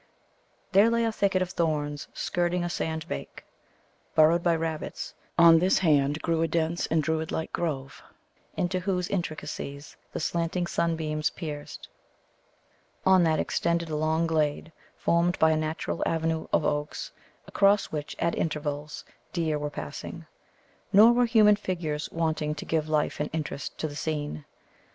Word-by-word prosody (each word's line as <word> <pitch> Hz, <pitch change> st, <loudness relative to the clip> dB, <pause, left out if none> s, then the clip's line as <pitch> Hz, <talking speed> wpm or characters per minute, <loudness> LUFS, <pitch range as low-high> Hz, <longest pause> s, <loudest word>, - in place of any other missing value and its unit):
There 205 Hz, +4 st, +6 dB
lay 230 Hz, 0 st, +2 dB
a 225 Hz, -, +1 dB
thicket 195 Hz, -3 st, +1 dB
of 180 Hz, -, -6 dB
thorns 150 Hz, -4 st, -1 dB
skirting 175 Hz, 0 st, -1 dB
a 175 Hz, -, -2 dB
sand 160 Hz, -2 st, -3 dB
bank, 70 Hz, -, -7 dB, 0.7 s
burrowed 160 Hz, +2 st, +5 dB
by 170 Hz, -1 st, +2 dB
rabbits, 160 Hz, -1 st, -4 dB, 0.2 s
on 170 Hz, -1 st, +8 dB
this 185 Hz, +3 st, +3 dB
hand 150 Hz, -3 st, +2 dB
grew 165 Hz, -1 st, +1 dB
a 165 Hz, -, +2 dB
dense 165 Hz, +1 st, 0 dB
and 160 Hz, -1 st, +1 dB
Druid 160 Hz, 0 st, -1 dB
like 160 Hz, -, -3 dB
grove, 140 Hz, -5 st, -3 dB, 0.6 s
into 185 Hz, +1 st, 0 dB
whose 180 Hz, -1 st, -1 dB
intricacies 155 Hz, -5 st, -5 dB
the -, -, -4 dB
slanting 170 Hz, +2 st, -1 dB
sunbeams 160 Hz, -3 st, 0 dB
pierced; 150 Hz, -3 st, -7 dB, 1.2 s
on 190 Hz, -1 st, +6 dB
that 160 Hz, -1 st, +2 dB
extended 170 Hz, -1 st, 0 dB
a -, -, -1 dB
long 160 Hz, +2 st, +1 dB
glade, 155 Hz, -1 st, 0 dB, 0.3 s
formed 170 Hz, +1 st, +2 dB
by 160 Hz, 0 st, +4 dB
a -, -, +3 dB
natural 155 Hz, +1 st, -2 dB
avenue 160 Hz, -1 st, -1 dB
of -, -, +2 dB
oaks, 150 Hz, 0 st, -2 dB, 0.3 s
across 200 Hz, 0 st, +3 dB
which, 150 Hz, -1 st, -4 dB
at 170 Hz, -, 0 dB
intervals, 150 Hz, -1 st, -3 dB, 0.3 s
deer 160 Hz, -4 st, 0 dB
were 145 Hz, 0 st, -2 dB
passing. 75 Hz, -, -7 dB, 0.7 s
Nor 220 Hz, +4 st, +8 dB
were 245 Hz, 0 st, +3 dB
human 215 Hz, -3 st, +5 dB
figures 170 Hz, -7 st, -3 dB
wanting 160 Hz, -2 st, -1 dB
to 150 Hz, -, -7 dB
give 155 Hz, -1 st, -1 dB
life 150 Hz, -1 st, 0 dB
and 150 Hz, -, -1 dB
interest 150 Hz, -3 st, -4 dB
to 155 Hz, -, -2 dB
the 145 Hz, -, -8 dB
scene. 145 Hz, -, -3 dB
160 Hz, 150 wpm, -27 LUFS, 150-175 Hz, 1.2 s, on